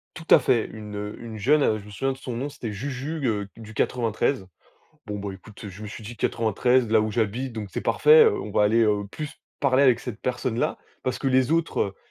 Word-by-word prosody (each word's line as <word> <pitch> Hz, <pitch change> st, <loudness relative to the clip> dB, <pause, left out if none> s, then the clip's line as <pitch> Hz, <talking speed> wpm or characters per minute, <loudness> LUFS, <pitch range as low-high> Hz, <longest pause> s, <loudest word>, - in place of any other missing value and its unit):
Tout 160 Hz, +1 st, -9 dB
à -, -, +10 dB
fait, 120 Hz, -4 st, +2 dB
une, 105 Hz, -1 st, -8 dB
heu, 105 Hz, 0 st, -5 dB
une 115 Hz, -2 st, -7 dB
jeune, 145 Hz, +7 st, +3 dB
heu, 110 Hz, -, +2 dB
je 100 Hz, -, -14 dB
me -, -, -11 dB
souviens 135 Hz, +6 st, -1 dB
de -, -, -8 dB
son 125 Hz, -3 st, -6 dB
nom, 135 Hz, +4 st, -2 dB
c'était 120 Hz, -5 st, -6 dB
Juju, 140 Hz, +8 st, -4 dB
heu, 105 Hz, -3 st, -1 dB
du 110 Hz, -1 st, -11 dB
93. 115 Hz, -2 st, 0 dB, 0.6 s
Bon, 105 Hz, -1 st, -4 dB
bah, 100 Hz, -1 st, -5 dB
écoute, 105 Hz, +3 st, -12 dB
je 100 Hz, +3 st, -10 dB
me 105 Hz, -, -6 dB
suis 110 Hz, +1 st, -9 dB
dit: 115 Hz, +2 st, -8 dB
«93, 115 Hz, +3 st, +2 dB
là 110 Hz, 0 st, +4 dB
où 110 Hz, 0 st, -1 dB
j'habite, 120 Hz, +4 st, -1 dB
donc 105 Hz, -3 st, -5 dB
c'est -, -, -2 dB
parfait, 465 Hz, +1 st, +6 dB
heu, 415 Hz, -3 st, +2 dB
on -, -, -7 dB
va -, -, +3 dB
aller, 115 Hz, +3 st, +4 dB
heu, 105 Hz, -2 st, +1 dB
plus 150 Hz, -2 st, -6 dB, 0.3 s
parler 140 Hz, -1 st, +3 dB
avec 125 Hz, -4 st, +5 dB
cette 120 Hz, -3 st, -7 dB
personne-là» 125 Hz, -1 st, -1 dB, 0.2 s
parce 130 Hz, -1 st, -2 dB
que 135 Hz, -, -4 dB
les 130 Hz, 0 st, +3 dB
autres, 160 Hz, -, 0 dB
115 Hz, 235 wpm, -25 LUFS, 105-130 Hz, 0.6 s, à